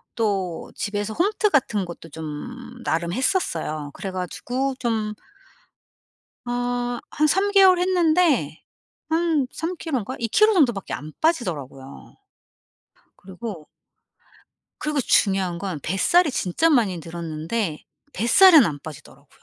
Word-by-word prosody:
또 195 -7 -2
집에서 205 +1 -3
홈트 415 - +1
같은 215 -8 +1
것도 170 -1 -10
좀 240 - -8
나름 170 -2 -1
했었어요. 165 - -1
그래 195 - -6
가지고 245 +9 -3
좀 220 -3 -1 1.3
어 245 0 -2
한 305 +1 +2
3 385 +6 +2
개월 380 -3 +6
했는데 335 - +2 0.5
한 320 -4 +1
3 345 +3 -4
킬로인가? 260 - -3
2 230 -2 -2
킬로 430 - +4
정도 290 - +4
밖에 195 - -7
안 155 +2 -6
빠지더라고요. 150 - -3 1.0
그리고 190 -3 -8 1.2
그리고 300 -1 0
중요한 190 -7 +2
건 185 -5 -4
뱃살이 300 - +2
진짜 265 - +1
많이 210 - +2
늘었는데 165 +2 -4 0.3
뱃살은 315 - +7
안 150 -7 -2
빠지더라고요. 155 -2 -12
230 Hz, 245 characters per minute, -23 LUFS, -, 1.3 s, 뱃살은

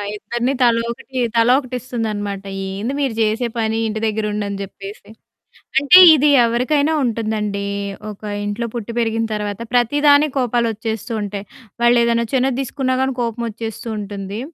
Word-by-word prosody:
ఇద్దరిని 240 +5 -2
తలోకటి 235 +2 0 0.2
తలోకటిస్తుందనమాట. 230 -5 0 0.3
ఏంది 215 +8 -3
మీరు 270 -5 0
జేసే 220 +3 +1
పని, 220 0 0
ఇంటి 215 0 -3
దగ్గర 220 0 -1
ఉండని 200 -1 -3
జెప్పేసి. 200 +2 -9 0.7
అంటే, 285 +6 +7 0.2
ఇది 295 +1 +3 0.2
ఎవరికైనా 285 +6 +1
ఉంటుందండి. 215 -3 -2 0.4
ఒక 210 +1 -11 0.2
ఇంట్లో 210 +3 -3
పుట్టి 235 -1 -5
పెరిగిన 225 0 0
తర్వాత, 205 0 -3
ప్రతిదానికి 285 +4 +4
కోపాలొచ్చేస్తూంటాయి. 220 -4 -2 0.4
వాళ్ళేదైనా 235 -1 +3
చిన్నది 260 0 +1
దీసుకున్నా 260 0 -1
గాని 265 0 0
కోపమోచ్చేస్తూంటుంది. 220 -3 -5
230 Hz, 110 wpm, -19 LUFS, 210-250 Hz, 0.7 s, అంటే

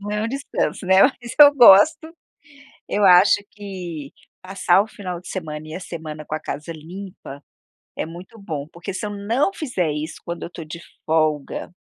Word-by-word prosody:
Não 205 +1 -6
é 210 0 -1
um 225 - -1
descanso, 275 -6 -3
né, 190 +1 +6
mas 245 -2 0
eu 290 -1 +10
gosto. 300 +7 +6 0.8
Eu 205 - 0
acho 185 +3 +7
que 180 -8 -8 0.3
passar 185 0 +2
o 210 - -5
final 180 -5 -7
de - - -14
semana 155 -4 -6
e 155 - -8
a - - -5
semana 155 -4 -8
com 155 - -4
a - - -4
casa 150 +1 -6
limpa 165 -3 -10 0.5
é - - -2
muito 175 +6 -12
bom, 155 -8 -5
porque 170 +3 -8
se 210 - -4
eu - - -5
não 225 - 0
fizer 190 - -2
isso 150 +2 -5
quando 170 0 -6
eu - - -7
tô 170 -2 -9
de 160 +2 -9 0.3
folga, 155 -2 0
180 Hz, 185 wpm, -21 LUFS, 160-205 Hz, 0.8 s, eu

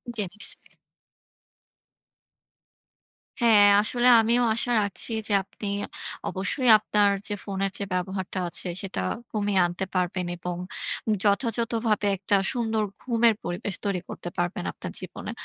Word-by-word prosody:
জী, 220 - -1
নিশ্চয়। 210 - -8 2.7
হ্যাঁ, 215 -3 +7
আসলে 240 +3 +1
আমিও 235 +2 +3
আশা 245 +1 -1
রাখছি 200 +3 -2 0.2
যে, - - -5
আপনি 205 +2 -8 0.6
অবশ্যই 205 +7 0
আপনার 210 -1 +2 0.2
যে - - -2
ফোনের 195 -1 -2
যে - - -3
ব্যবহারটা 185 +1 -3
আছে। 175 - -6
সেটা 195 - -4 0.3
কমিয়ে 205 -2 +1
আনতে 175 +2 -3
পারবেন 180 0 0
এবং 175 0 -4 0.7
যথাযথভাবে 225 0 +1
একটা 200 +2 +1 0.2
সুন্দর 225 -3 0 0.2
ঘুমের 235 -2 +3
পরিবেশ 175 +2 -3
তৈরি 200 -3 0
করতে 175 - -6
পারবেন 175 +1 -1
আপনার - - -8
জীবনে। - - -7
205 Hz, 120 wpm, -26 LUFS, 190-225 Hz, 2.7 s, হ্যাঁ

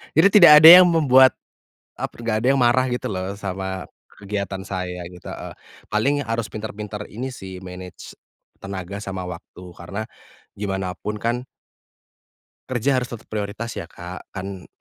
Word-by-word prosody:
jadi 165 +5 +7
tidak 175 -7 +9
ada 160 - +13
yang 180 - +7
membuat, 135 -6 +5 0.6
ap - - -4
nggak 115 -2 -2
ada 125 - 0
yang 135 - +1
marah 125 +2 +4
gitu 125 - -3
loh, 95 0 -4
sama 95 -1 -5 0.3
kegiatan 100 -1 -4
saya, 90 -2 -5
gitu 90 -1 -15
e. - - -7 0.4
Paling 140 +7 +1
harus 115 -3 -2
pintar-pintar 105 -1 -6
ini 125 +4 -6
sih 95 -4 -9
manage 90 0 -10 0.5
tenaga 95 0 -6
sama 95 -3 -5
waktu 90 +1 -10
karena, 95 +6 -6 0.5
gimana 95 -2 -3
pun 105 0 -5
kan 120 +2 -1 1.2
kerja 130 +1 +1
harus 125 - -5
tetap 120 - -10
prioritas 110 +2 -4
ya, 85 - -7
Kak. 90 +1 -10
Kan 95 -1 -7
105 Hz, 150 wpm, -22 LUFS, 95-120 Hz, 1.2 s, ada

